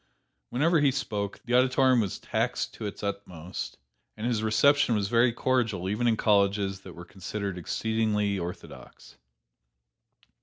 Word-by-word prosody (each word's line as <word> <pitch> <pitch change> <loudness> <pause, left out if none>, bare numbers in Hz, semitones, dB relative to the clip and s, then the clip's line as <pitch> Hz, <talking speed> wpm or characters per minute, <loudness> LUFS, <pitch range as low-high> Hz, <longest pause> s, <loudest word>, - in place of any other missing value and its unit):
Whenever 160 +6 +2
he 145 -1 +4
spoke, 105 -7 -3
the 120 - -3
auditorium 130 0 +4
was 100 -4 -3
taxed - - -2
to 110 - -5
its 100 - -8
utmost, 95 -4 -5 0.4
and 110 - -4
his 120 -3 0
reception 120 +4 +3
was 100 -1 -1
very 120 +1 +4
cordial, 115 -7 0
even 105 +5 0
in 115 -2 +2
colleges 100 -2 +2
that 95 -2 -11
were 85 - -10
considered 100 +1 -5
exceedingly 105 +1 -1
orthodox. 85 0 -9
105 Hz, 140 wpm, -27 LUFS, 100-120 Hz, 0.4 s, he